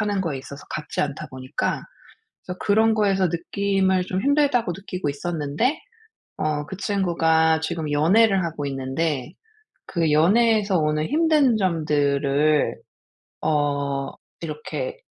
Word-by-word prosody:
하는 205 -2 0
거에 155 -7 -3
있어서 140 +2 -10
같지 150 -1 -3
않다 145 -1 -4
보니까 130 0 -3 0.6
그래서 180 - -5
그런 220 +2 +3
거에서 195 -3 +2
느낌을 190 +2 0
좀 185 +1 -3
힘들다고 280 -7 +2
느끼고 185 -5 -4
있었는데 155 - -1 0.6
어 150 -1 -1
그 190 - -7
친구가 165 -5 +2
지금 160 -1 -3
연애를 195 +6 +4
하고 155 -3 -4
있는데 135 +2 -2 0.5
그 165 -4 0
연애에서 205 +4 +3
오는 150 0 0
힘든 300 -6 +3
점들을 150 -4 +1 0.7
어 145 -2 0 0.3
이렇게 170 - -5
165 Hz, 270 characters per minute, -23 LUFS, 150-200 Hz, 0.7 s, 연애를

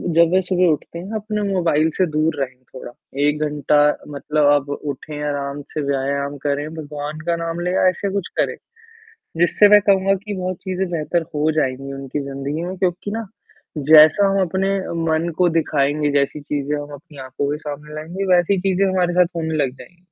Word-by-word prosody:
जब 170 0 +5
वह 190 - +4
सुबह 180 0 +1
उठते 170 +3 -7
हैं 190 +5 -8
अपने 210 0 -3
मोबाइल 160 -3 +2
से 185 - +3
दूर 155 +1 +1
रहे 130 -1 -3 0.2
थोड़ा, 130 - -8 0.3
1 150 +1 +1
घंटा 145 0 +2 0.3
मतलब 150 +1 0
आप 145 0 0
उठे 145 +1 -5
आराम 140 0 -3
से, 155 - -2
व्यायाम 140 +1 -1
करें, 145 +2 -1
भगवान 150 0 -6
का 170 - +2
नाम 165 +1 -3
ले 180 +1 -1
या 185 - +3
ऐसा 195 +2 -3
कुछ 200 -3 -2
करें, - - +1 0.8
जिससे 175 +4 +5
मैं 210 0 +7
कहूँगा 195 0 +4
कि 210 - -4
बहुत 185 -1 -3
चीज़ें 190 -1 -2
बेहतर 165 +1 -1
हो 150 +2 +2
जाएँगी 135 -2 -2
उनकी 135 +1 -5
ज़िंदगी 140 +3 -4
में। 185 +1 -5
क्योंकि 180 +2 -1
ना, 225 0 -3 0.5
जैसा 155 +6 +6
हम 195 0 +1
अपने 190 +2 0 0.4
मन 160 +2 +1
को 180 -1 +4
दिखाएँगे, 150 -2 +1
जैसी 145 +1 0
चीज़ें 145 0 -2
हम 145 0 -7
अपनी 150 +1 -13
आँखों 140 +2 -2
के 150 - -2
सामने 150 0 -8
लाएँगे 170 +6 -4
वैसी 180 +2 +2
चीज़ें 195 0 +2
हमारे 180 -2 +1
साथ 180 0 +2
होने 160 -1 -2
लग 130 - -1
जाएँगी। 175 - -15
155 Hz, 190 wpm, -20 LUFS, 145-180 Hz, 0.8 s, मैं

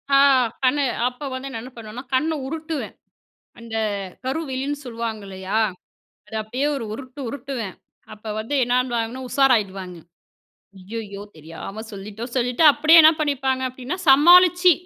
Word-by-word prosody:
அ - - +7 0.5
கண்ணு, 280 +3 +3 0.2
அப்ப 250 +3 -7
வந்து 260 +1 -5
நான் 225 - -5
என்ன 255 +3 -10
பண்ணுவேன்னா, 230 +3 -8
கண்ண 310 +5 +1 0.2
உருட்டுவேன். 315 0 -5 0.7
அந்த 230 -1 -7 0.5
கருவிழின்னு 275 0 -3
சொல்லுவாங்க 230 -3 -5
இல்லயா? 190 +2 -3 0.7
அத 220 - -12
அப்டியே 255 +7 -2
1 235 - -4
உருட்டு 255 +4 -9
உருட்டுவேன்! 245 -6 -5 0.4
அப்ப 215 0 -7
வந்து 230 +7 -4
என்னுவாங்கன்னா, 245 0 -1
உஷாராயிடுவாங்க. 195 -10 +1 0.8
அய்யய்யோ! 200 +1 -7
தெரியாம 165 +7 -8
சொல்லிட்டோம். 210 +5 -7
சொல்லிட்டு 250 +4 +1
அப்டியே 315 +3 +6
என்ன 315 +1 +8
பண்ணிப்பாங்க 265 -3 0
அப்டின்னா 255 +6 -6
சமாளிச்சு, 355 +5 +7
250 Hz, 125 wpm, -22 LUFS, 220-280 Hz, 0.8 s, என்ன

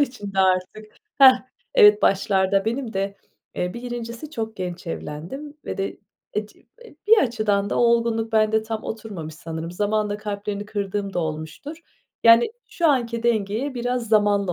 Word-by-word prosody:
içinde 205 -8 -2
artık, 190 +3 0 0.2
hah, 260 -2 +8 0.3
evet, 210 0 +7
başlarda 195 0 +2
benim 235 +1 -2
de, 195 +1 -2 0.4
eee, 180 +3 -2
bir 235 - -7
1.'si 240 +3 -6
çok 220 -6 -5
genç 180 -1 -5
evlendim 175 - -6
ve - - -5
de 195 - -3 0.3
ec 210 0 -4 0.3
e - - -15
bir 450 0 +7
açıdan 215 - +1
da - - 0
olgunluk 230 -1 +2
bende 220 0 +3
tam 220 0 -5
oturmamış 200 -9 -6
sanırım, 160 +1 -6
zamanla 210 +2 -1
kalplerini 205 0 -4
kırdığım 200 -1 -3
da - - 0
olmuştur. 160 - -5 0.5
Yani, 230 - +7 0.2
şu 340 - 0
anki 235 -4 0
dengeye 230 +4 0
biraz 245 -1 -2
zamanla 205 -3 +3
215 Hz, 150 wpm, -23 LUFS, 195-235 Hz, 0.5 s, hah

